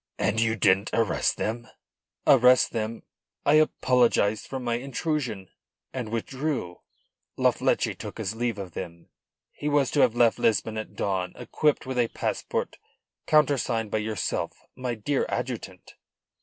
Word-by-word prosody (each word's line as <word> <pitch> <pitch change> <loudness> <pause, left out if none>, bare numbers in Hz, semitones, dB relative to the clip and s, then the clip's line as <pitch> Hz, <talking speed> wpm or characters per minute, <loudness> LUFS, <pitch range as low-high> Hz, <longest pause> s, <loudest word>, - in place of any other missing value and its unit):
"And 110 +2 +1
you 115 0 +2
didn't 100 -1 +3
arrest 115 -4 +1
them?" 115 +2 -3 0.6
"Arrest 125 -1 +6
them! 115 0 -3 0.4
I 145 - +5
apologised 120 -7 +2
for 135 - -4
my 120 -2 -2
intrusion, 130 - -3 0.4
and 125 -4 -4
withdrew. 125 - -3 0.6
La - - +4
Fleche - - 0
took - - -8
his 95 - -3
leave 115 -1 -2
of 95 -3 -6
them. 85 +1 -8 0.4
He 150 - -4
was 145 -3 +2
to 145 - +1
have 120 -4 +4
left 120 -1 +3
Lisbon 110 -2 +1
at 110 - -8
dawn 95 -2 -1
equipped 150 -3 0
with 130 -1 -2
a 120 - +3
passport - - -3 0.5
countersigned 130 -7 +2
by 110 - +1
yourself, 110 0 -2 0.2
my 125 -2 -3
dear 130 +6 -1
adjutant." 105 -7 -5
115 Hz, 140 wpm, -26 LUFS, 110-130 Hz, 0.6 s, Arrest